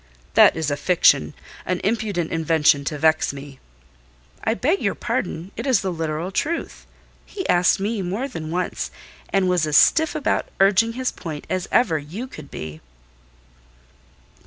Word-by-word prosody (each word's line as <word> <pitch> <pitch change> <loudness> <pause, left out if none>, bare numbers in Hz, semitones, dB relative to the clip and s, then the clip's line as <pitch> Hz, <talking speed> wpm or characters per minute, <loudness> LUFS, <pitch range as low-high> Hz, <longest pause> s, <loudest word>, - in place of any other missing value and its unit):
"That - - +6
is 155 -2 -1
a 145 - -1
fiction—an 175 - +1
impudent 200 -5 -1
invention 160 -3 +3
to 150 - -3
vex 155 0 +2
me." 140 -1 -10 0.8
"I 220 - +1
beg 315 +11 0
your - - 0
pardon, 170 +5 -3
it - - -5
is 255 -6 +3
the 190 - -2
literal 165 +1 -3
truth: 320 - -3 0.4
he 380 - -6
asked 180 +1 +3
me 205 +1 -2
more 195 +9 -2
than 165 - -7
once, 180 +2 -2 0.4
and 195 -1 +2
was 180 -4 +1
as 150 -2 +4
stiff 320 0 +4
about 305 - 0
urging 205 +4 +4
his 255 +1 -2
point 155 -4 -7
as 185 -1 -1
ever 165 -11 +3
you 170 - -7
could 155 - -11
be." 80 0 -8
180 Hz, 155 wpm, -22 LUFS, 155-220 Hz, 0.8 s, That